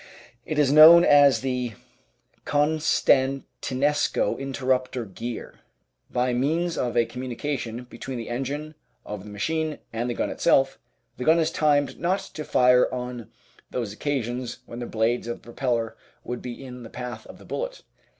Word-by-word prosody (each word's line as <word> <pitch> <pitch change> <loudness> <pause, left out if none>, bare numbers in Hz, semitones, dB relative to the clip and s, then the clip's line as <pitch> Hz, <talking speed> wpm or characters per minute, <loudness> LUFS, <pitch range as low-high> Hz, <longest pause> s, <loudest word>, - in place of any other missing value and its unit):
It 155 - -2
is 145 -3 +4
known 165 +3 +10
as 145 -2 +6
the 125 -3 -2 0.7
Constantinesco 145 -2 +1
Interrupter 130 -2 -1
Gear. 115 +4 -7 0.5
By 125 0 0
means 160 +7 0
of 120 -1 -1
a 120 - +4
communication 125 0 -4
between 125 +1 -7
the 115 - -6
engine 140 +5 -4 0.3
of 105 -2 -6
the - - -9
machine 155 +9 -2 0.2
and 120 +2 -2
the 120 - -2
gun - - -1
itself, - - +2 0.4
the 125 - -4
gun 160 +5 +5
is 165 -1 +1
timed 145 -3 +1
not 180 +3 +1 0.2
to 155 - -5
fire 125 -2 +4
on 125 -3 -5 0.4
those 115 -5 -3
occasions 125 -1 -3
when 120 - -8
the 120 - -4
blades 115 +2 0
of 120 - -3
the - - -24
propeller 120 -2 -2 0.3
would 125 0 -5
be 125 +2 -7
in 125 -1 -9
the 115 - -9
path 125 0 -7
of - - -12
the - - -16
bullet. - - -5
130 Hz, 155 wpm, -25 LUFS, 120-145 Hz, 0.7 s, known